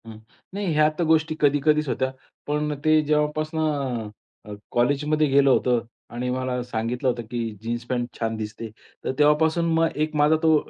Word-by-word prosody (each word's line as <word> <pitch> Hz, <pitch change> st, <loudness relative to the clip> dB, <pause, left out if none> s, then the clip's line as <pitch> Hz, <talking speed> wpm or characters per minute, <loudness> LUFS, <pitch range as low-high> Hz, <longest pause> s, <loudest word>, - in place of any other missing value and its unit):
हं, 110 Hz, -1 st, -9 dB, 0.4 s
नाही 200 Hz, -3 st, -2 dB
ह्या 150 Hz, 0 st, +4 dB
तर -, -, +2 dB
गोष्टी 160 Hz, 0 st, +2 dB
कधी-कधीच 150 Hz, +1 st, +3 dB
होत्या 130 Hz, +1 st, -1 dB, 0.4 s
पण 150 Hz, 0 st, -1 dB
ते 155 Hz, 0 st, +5 dB
जेव्हापासून 155 Hz, +1 st, 0 dB, 0.9 s
अ, 105 Hz, -, -8 dB, 0.2 s
कॉलेजमध्ये 145 Hz, +5 st, +1 dB
गेलं 140 Hz, 0 st, +4 dB
होतो 125 Hz, -2 st, +3 dB, 0.3 s
आणि 125 Hz, +1 st, -3 dB
मला 130 Hz, 0 st, -2 dB
सांगितलं 120 Hz, +2 st, -3 dB
होतं, 120 Hz, -1 st, -2 dB
की 120 Hz, -, -2 dB, 0.2 s
जीन्स 120 Hz, +1 st, -3 dB
पॅन्ट 120 Hz, -2 st, -1 dB
छान 115 Hz, -1 st, -1 dB
दिसते. 110 Hz, +1 st, -6 dB, 0.3 s
तर -, -, -1 dB
तेव्हापासून 160 Hz, +3 st, +3 dB
मग 165 Hz, 0 st, +2 dB
एक 155 Hz, -, -11 dB
माझा 150 Hz, +1 st, +4 dB
तो 160 Hz, -1 st, +5 dB
145 Hz, 165 wpm, -24 LUFS, 125-155 Hz, 0.9 s, ते